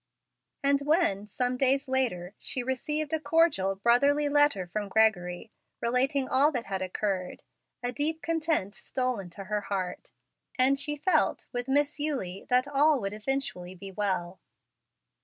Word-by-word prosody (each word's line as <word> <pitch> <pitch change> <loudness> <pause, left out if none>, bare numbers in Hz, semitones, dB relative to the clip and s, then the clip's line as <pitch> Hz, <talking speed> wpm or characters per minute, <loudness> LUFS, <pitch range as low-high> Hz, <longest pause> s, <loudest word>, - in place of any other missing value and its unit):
And 280 0 +4
when, 280 - +2
some 250 +4 -1
days 270 +1 +3
later, 230 -9 0
she 255 - -3
received 300 +4 -2
a 320 - +1
cordial, 305 - +2
brotherly 280 +8 +3
letter 290 -10 +3
from 205 +3 -4
Gregory, 195 -2 +1 0.3
relating 260 +3 +1
all 285 +4 +4
that 245 -3 -2
had 190 -1 -3
occurred, 185 0 -3 0.4
a 245 - -1
deep 310 +5 -1
content 315 - 0
stole 255 -1 -2
into 190 +1 -8
her 210 +1 -2
heart, 190 -3 -4 0.5
and 265 +2 +3
she 295 +1 0
felt, 365 +6 +1
with 245 +1 -3
Miss 290 +2 +1
Eulie, 255 -12 -3
that 250 +2 +3
all 290 +1 +3
would 195 -2 -4
eventually 210 -6 -3
be 195 +2 -9
well. 185 -2 -2
250 Hz, 145 wpm, -28 LUFS, 195-285 Hz, 0.5 s, And